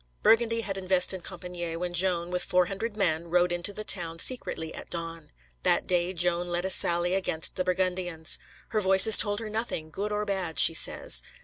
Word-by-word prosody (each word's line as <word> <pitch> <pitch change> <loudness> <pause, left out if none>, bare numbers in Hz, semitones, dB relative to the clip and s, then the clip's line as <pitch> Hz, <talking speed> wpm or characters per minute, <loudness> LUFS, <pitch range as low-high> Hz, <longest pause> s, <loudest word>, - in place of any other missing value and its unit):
Burgundy 230 0 +1
had 195 -3 -6
invested 185 0 +1
Compičgne, 175 -2 -8
when 175 +1 -6
Joan, 175 -1 0
with 180 0 +1
four 180 0 0
hundred 205 +4 -7
men, 170 -4 -2
rode 175 +1 0
into 175 +3 -2
the 215 +1 -7
town 170 -5 0
secretly 165 -6 0
at - - -10
dawn. 165 -2 -8 0.3
That - - -1
day 175 0 -1
Joan 175 0 -2
led 175 +1 -4
a 190 - 0
sally 175 0 +2
against 180 -4 0
the 185 - -3
Burgundians. 180 -3 -2 0.3
Her 215 - -2
Voices 190 +3 +8
told 205 -1 +4
her 225 -1 -7
nothing, 215 -8 -5
good 205 +5 -6
or 210 0 -3
bad, 190 -6 -5
she - - +8
says. - - +2
180 Hz, 190 wpm, -25 LUFS, 170-195 Hz, 0.3 s, Voices